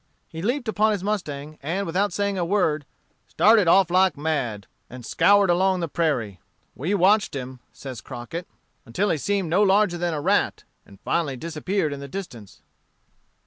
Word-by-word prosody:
He 165 Hz, -, -8 dB
leaped 245 Hz, +5 st, -1 dB
upon 215 Hz, 0 st, +2 dB
his 195 Hz, -3 st, -4 dB
mustang, 155 Hz, -8 st, -4 dB
and 175 Hz, +8 st, -2 dB
without 190 Hz, +4 st, 0 dB
saying 200 Hz, +2 st, -1 dB
a 180 Hz, -, -1 dB
word, 165 Hz, -6 st, 0 dB, 0.4 s
"started 215 Hz, -3 st, +4 dB
off 185 Hz, +1 st, +5 dB
like 185 Hz, -3 st, +3 dB
mad," 135 Hz, -10 st, -2 dB, 0.2 s
and 125 Hz, -1 st, -10 dB
scoured 200 Hz, -, +4 dB
along 185 Hz, +1 st, +2 dB
the 170 Hz, -, -2 dB
prairie. 135 Hz, -, -1 dB, 0.3 s
"We 175 Hz, +10 st, -2 dB
watched 200 Hz, -1 st, +3 dB
him," 130 Hz, -1 st, -6 dB
says 130 Hz, -4 st, -9 dB
Crockett, 165 Hz, +10 st, -7 dB, 0.4 s
"until 185 Hz, -, -1 dB
he 160 Hz, -, 0 dB
seemed 195 Hz, -1 st, -1 dB
no 185 Hz, +4 st, +3 dB
larger 195 Hz, -3 st, +3 dB
than 175 Hz, -2 st, -1 dB
a -, -, -2 dB
rat, -, -, +1 dB, 0.2 s
and 100 Hz, -1 st, -17 dB
finally 145 Hz, -6 st, -1 dB
disappeared 160 Hz, +2 st, -2 dB
in 140 Hz, -, -7 dB
the 140 Hz, -, -7 dB
distance." 130 Hz, -, -9 dB
170 Hz, 170 wpm, -24 LUFS, 145-200 Hz, 0.4 s, off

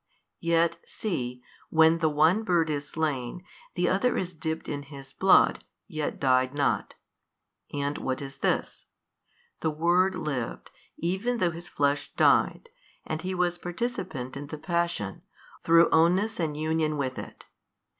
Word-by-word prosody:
Yet 170 Hz, 0 st, +2 dB
see, 125 Hz, -, -4 dB, 0.3 s
when 160 Hz, +1 st, +5 dB
the 160 Hz, -2 st, +2 dB
one 160 Hz, +7 st, +3 dB
bird 170 Hz, -6 st, +1 dB
is 145 Hz, -1 st, -3 dB
slain, 150 Hz, 0 st, -2 dB, 0.3 s
the -, -, +1 dB
other 250 Hz, -1 st, +2 dB
is 180 Hz, -1 st, -3 dB
dipped 160 Hz, 0 st, -4 dB
in 145 Hz, -1 st, -3 dB
his 140 Hz, -1 st, -11 dB
blood, 190 Hz, 0 st, +4 dB, 0.2 s
yet 155 Hz, -5 st, -3 dB
died 130 Hz, 0 st, +2 dB
not. 140 Hz, -1 st, 0 dB, 0.8 s
And 145 Hz, 0 st, -2 dB
what 130 Hz, -1 st, -2 dB
is 140 Hz, 0 st, -8 dB
this? -, -, -1 dB, 0.7 s
The 160 Hz, -, 0 dB
Word 175 Hz, +5 st, +2 dB
lived, 140 Hz, -9 st, -4 dB, 0.3 s
even 195 Hz, +8 st, -1 dB
though 180 Hz, -6 st, +1 dB
His 170 Hz, +2 st, -9 dB
Flesh 145 Hz, 0 st, 0 dB
died, 470 Hz, -, +3 dB, 0.4 s
and 155 Hz, 0 st, -3 dB
He 185 Hz, +1 st, -3 dB
was 175 Hz, -1 st, 0 dB
participant 175 Hz, -, -4 dB
in 140 Hz, +1 st, -6 dB
the 155 Hz, -, -6 dB
Passion, 170 Hz, -, -2 dB, 0.4 s
through 165 Hz, 0 st, +6 dB
ownness 180 Hz, +7 st, +3 dB
and 155 Hz, -3 st, -1 dB
union 155 Hz, 0 st, 0 dB
with 130 Hz, -2 st, -2 dB
it. -, -, -10 dB
160 Hz, 145 wpm, -27 LUFS, 145-175 Hz, 0.8 s, through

